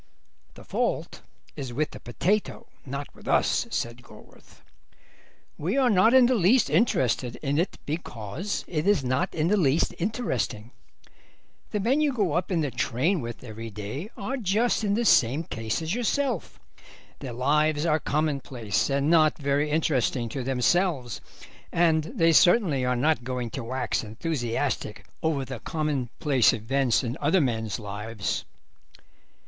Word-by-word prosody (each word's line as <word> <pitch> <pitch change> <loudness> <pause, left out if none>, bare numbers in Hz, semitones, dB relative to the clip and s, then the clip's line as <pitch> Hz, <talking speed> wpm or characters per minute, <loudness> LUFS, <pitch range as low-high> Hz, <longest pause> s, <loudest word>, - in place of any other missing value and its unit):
"The - - -12
fault - - -2 0.3
is 130 -4 -6
with 150 +5 -1
the - - -9
potato, 185 - -1 0.2
not 140 +2 -5
with - - -15
us," - - +2
said 120 +1 -3
Gorworth; 125 - -18 1.0
"we 185 - -1
are 260 -3 +4
not 210 +5 +5
in 260 -2 +8
the 255 - +3
least 215 - +3
interested 130 - +1
in 145 +1 +1
it 175 - -1
because 150 - -4
it 155 +1 -2
is 200 -9 +3
not 130 +1 0
in 155 0 +1
the 210 +4 +3
least 155 -3 +2
interesting. 150 - -2 1.0
The 210 - -2
men 255 +9 +2
you 295 -2 +2
go 200 -10 0
up 175 +3 -1
in 170 -3 +1
the 145 -3 -1
train 130 - 0
with 120 +1 -7
every 115 -1 -7
day 105 - -6
are 260 +7 -3
just 225 +1 +1
in 205 -1 +1
the 235 +2 0
same 135 - +4
case 115 0 -3
as 160 +3 -2
yourself; 245 - -1 0.6
their 130 -4 -6
lives 150 +5 +1
are 155 -1 +2
commonplace 140 -9 -1
and 140 +1 +1
not 155 -2 +4
very 145 +1 0
interesting 135 -6 0
to 130 +2 -4
themselves, 135 - 0 0.5
and 160 -2 +3
they 165 +1 +2
certainly 170 - +4
are 125 0 +1
not 150 +1 +1
going 125 -2 -3
to 130 - -5
wax 130 +2 -2
enthusiastic 120 +2 -3 0.2
over 150 -4 0
the 130 -2 -6
commonplace 140 -3 +1
events 125 +3 +1
in 120 +1 -4
other 155 +6 +3
men's 115 - -1
lives. 105 0 -4
145 Hz, 150 wpm, -26 LUFS, 125-175 Hz, 1.0 s, in